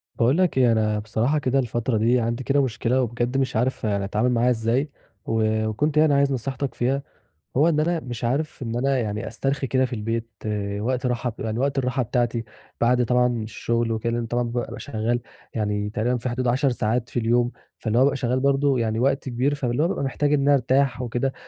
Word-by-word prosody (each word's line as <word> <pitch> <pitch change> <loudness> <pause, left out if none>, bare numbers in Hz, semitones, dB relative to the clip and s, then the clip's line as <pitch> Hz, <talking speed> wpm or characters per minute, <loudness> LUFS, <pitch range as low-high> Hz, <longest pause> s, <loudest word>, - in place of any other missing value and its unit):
باقول 125 +6 +3
لك 180 -6 +2
إيه 125 -3 +5
أنا 110 -1 +1
بصراحة 115 +7 0
كده 135 -1 +1
الفترة 120 -1 -1
دي 120 +3 +3
عندي 115 +2 -2
كده 140 +2 +2
مشكلة، 125 +1 0
وبجد 120 +1 -1
مش 135 -2 0
عارف 125 +4 0
يعني 100 -2 0
أتعامل 105 +5 +1
معاها 120 +1 +3
إزاي؟ 120 +5 +1 0.4
و 110 -1 +1
وكنت 145 +8 0
يعني 155 -1 +5
عايز 140 0 +3
نصيحتك 130 +1 -2
فيها، 135 +3 0 0.5
هو 155 +5 +5
إن 155 -2 +1
أنا 170 +2 +1
مش 125 -5 -7
عارف 140 +6 -1
إن 115 -1 -3
أنا 135 +2 +1
يعني 110 -1 -3
أسترخي 135 +5 -2
كده 130 +1 +2
في 125 - -6
البيت 115 +1 -3 0.5
وقت 125 +4 -1
راحة 125 -1 -1
يعني 110 +1 -2
وقت 140 +1 0
الراحة 130 0 0
بتاعتي، 120 0 0 0.4
بَعد 125 +1 +3
طبعًا 125 +1 +3 0.2
الشغل 115 +1 -1
وكده، 115 +1 -1
لإن 120 0 -1
طبعًا 120 +1 0
بابقى 120 0 -4
شغال 120 -2 -2 0.3
يعني 105 -1 -1
تقريبًا 115 +4 0
في 125 +2 -3
حدود 125 +1 -2
10 135 +4 +2
ساعات 120 0 -1
في - - -1
اليوم، 120 +1 +2 0.3
فاللي 110 0 -1
هو - - +5
بابقى 140 0 +3
شغال 125 0 0
برضه 140 0 +2
يعني 110 -1 0
وقت 135 +1 +1
كبير 130 +4 0
فاللي 130 0 0
هو - - +3
بابقى 180 - -2
محتاج 145 +2 0
إن 145 - +3
أنا 145 +1 +4
أرتاح 135 -1 +2
وكده، 125 +2 -1
125 Hz, 205 wpm, -24 LUFS, 115-135 Hz, 0.5 s, إيه